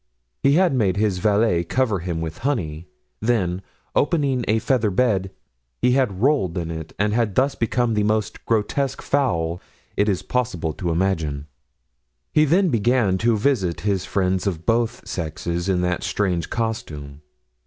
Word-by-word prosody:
He 140 - +4
had 175 0 +4
made 100 -7 +1
his 100 -3 +1
valet 105 -3 +2
cover 110 +2 0
him 85 -1 -3
with 80 -1 -5
honey; 90 - -2 0.3
then, 95 -6 0 0.3
opening 140 -5 +1
a 110 - +3
feather 115 -2 +1
bed, 100 -2 +1 0.5
he 125 - +3
had 125 -7 +1
rolled 130 - +2
in 85 -1 -3
it 80 -1 -6
and 105 +1 +1
had 115 -4 0
thus 135 +2 +3
become 120 0 0
the 105 - +1
most 105 0 -1
grotesque 130 +5 0
fowl 90 -12 0 0.3
it 105 +1 +2
is 95 - -1
possible 90 -11 -1
to 90 +2 -3
imagine. 80 -5 -1 0.9
He 155 - +5
then 180 +5 +3
began 115 -5 +2
to 115 -1 +2
visit 105 -8 0
his 100 -3 0
friends 95 0 0
of 85 -4 -3
both 115 0 0
sexes, 85 +2 -3
in 90 -2 +2
that 90 -1 0
strange 90 -5 -1
costume. 75 -11 -4
105 Hz, 155 wpm, -22 LUFS, 90-120 Hz, 0.9 s, He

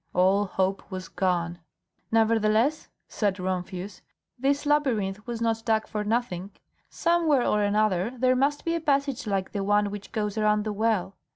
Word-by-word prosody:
All 190 +3 +4
hope 190 0 -1
was 185 -2 -6
gone. 175 -2 -1 0.5
"Nevertheless," 225 +5 +2 0.2
said 205 -3 -1
Rumphius, 185 +1 -4 0.4
"this 280 +3 +1
labyrinth 220 -9 0
was 235 -1 -4
not 225 -1 0
dug 220 -1 +1
for 210 -1 -3
nothing. 210 -4 -1 0.4
Somewhere 330 -6 +2
or 210 - +2
another 205 -1 +1
there 255 +1 +3
must 280 +3 0
be 335 - +1
a 335 - -1
passage 280 -5 0
like 195 -2 -1
the 200 -2 -2
one 205 0 +2
which 205 -1 -8
goes 215 -1 -2
around 210 0 +2
the 215 -1 -3
well. 205 -3 0
210 Hz, 160 wpm, -26 LUFS, 195-240 Hz, 0.5 s, All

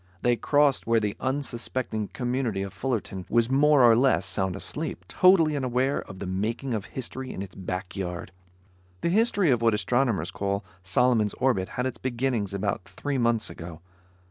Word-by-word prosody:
They 120 0 +4
crossed 145 0 +2
where 115 0 +4
the 105 -2 -2
unsuspecting 130 -4 -2
community 120 -5 -2
of 100 -1 -7
Fullerton 100 -6 -3
was 120 +1 +2
more 145 0 +5
or 115 -2 +7
less 125 -5 +3
sound 95 0 -1
asleep, 90 +2 -4
totally 170 - +4
unaware 130 0 0
of 95 - -11
the 100 - -5
making 110 +8 -2
of 105 -3 -2
history 130 0 -6
in 95 - -5
its 95 - -10
back 90 0 -5
yard. 90 -1 -4 0.7
The - - +1
history 200 - +3
of 120 -2 +2
what 115 -2 +3
astronomers 105 -4 0
call 100 0 -2 0.2
Solomon's 105 +3 +2
Orbit 120 -8 +1
had 125 - 0
its 130 - -3
beginning 120 -4 -1
about 100 -1 -2
three 135 +9 -3
months 115 -2 +1
ago. 85 -1 -9
115 Hz, 170 wpm, -26 LUFS, 100-130 Hz, 0.7 s, or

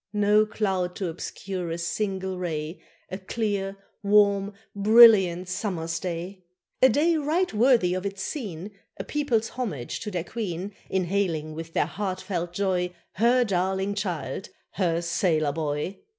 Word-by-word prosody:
No 210 +1 +4
cloud 190 -4 -1
to 190 -3 -2
obscure 180 +1 -5
a 165 - -3
single 190 +1 -2
ray, 160 -1 -4 0.3
A 185 - -4
clear, 200 -1 -2 0.2
warm, 200 -1 +4 0.2
brilliant 200 -4 +7
summer's 170 -4 -3
day. 180 +2 -5 0.4
A 260 - +8
day 315 +7 +3
right 315 +4 0
worthy 225 -5 +4
of 185 0 -2
its 195 -1 -4
scene, 205 - -5 0.3
A - - -4
people's 255 -7 0
homage 180 - -4
to 210 - -5
their 180 -4 -2
Queen, 195 -1 -4 0.2
In 190 -1 +1
hailing 170 -5 -1
with 165 +1 -7
their - - +2
heartfelt 185 -3 -3
joy 180 -1 -1 0.2
Her 240 +4 +4
darling 190 -1 0
child 180 -7 -4 0.2
her 170 -3 0
sailor 165 -3 +1
boy! 150 +4 -3
190 Hz, 140 wpm, -26 LUFS, 175-210 Hz, 0.4 s, A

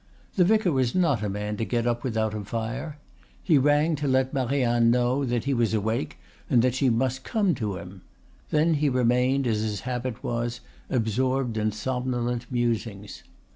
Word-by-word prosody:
The 185 - +4
vicar 215 -1 +3
was 130 -2 0
not 155 - +2
a 105 - -1
man 105 +1 -3
to 115 - -1
get 120 +1 -1
up 120 -1 0
without 110 -4 -1
a 105 -1 -4
fire. 115 +9 -4 0.5
He 160 -6 +4
rang 145 +4 +3
to 145 0 -2
let 130 0 +1
Marianne 120 -3 +2
know 125 +3 +2
that 120 -2 -1
he 140 - 0
was 115 -3 +1
awake 110 -5 -2 0.3
and 120 -2 +4
that 125 -1 +2
she 130 0 +2
must 130 +2 0
come 205 -5 +1
to 105 -7 -3
him; 95 +1 -10 0.5
then 155 +2 +3
he 150 -1 +2
remained, 125 +2 +2
as 110 -3 +1
his 105 -2 -2
habit 125 -2 -4
was, 120 0 -2 0.3
absorbed 125 +2 0
in 110 0 0
somnolent 120 +1 -2
musings. 115 -4 -2
120 Hz, 175 wpm, -26 LUFS, 115-135 Hz, 0.5 s, The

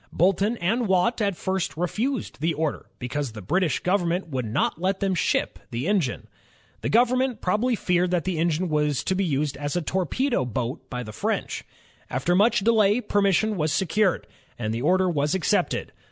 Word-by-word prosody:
Boulton 195 +6 +2
and 225 +6 0
Watt 190 +6 +2
at 200 -4 0
first 190 -4 -2
refused 220 - -2
the 165 0 +1
order, 155 0 -2
because 130 0 -3
the 110 - -8
British 180 - +1
government 180 -1 0
would 130 -4 -2
not 115 +8 -1
let 190 +1 0
them 195 -2 +1
ship 180 - 0
the 120 +7 -3
engine. 185 -12 0 0.6
The - - -2
government 250 +1 +2
probably 220 +7 +1
feared 180 -3 +1
that 175 -2 0
the 185 -4 -2
engine 170 +2 +1
was 150 -3 0
to - - 0
be 195 +1 0
used 145 -4 -1
in 145 - -9
a 145 - -1
torpedo 190 - 0
boat 125 +1 -4
by 125 -1 -4
the 110 -2 -9
French. - - -2 0.5
After 130 +8 0
much 220 +3 +4
delay, 215 0 +4
permission 205 -1 +1
was 155 -2 0
secured, 190 +3 +1 0.3
and 110 -2 -2
the 115 - -3
order 185 +6 +3
was 150 -1 +1
accepted. 185 - 0
180 Hz, 180 wpm, -25 LUFS, 150-205 Hz, 0.6 s, much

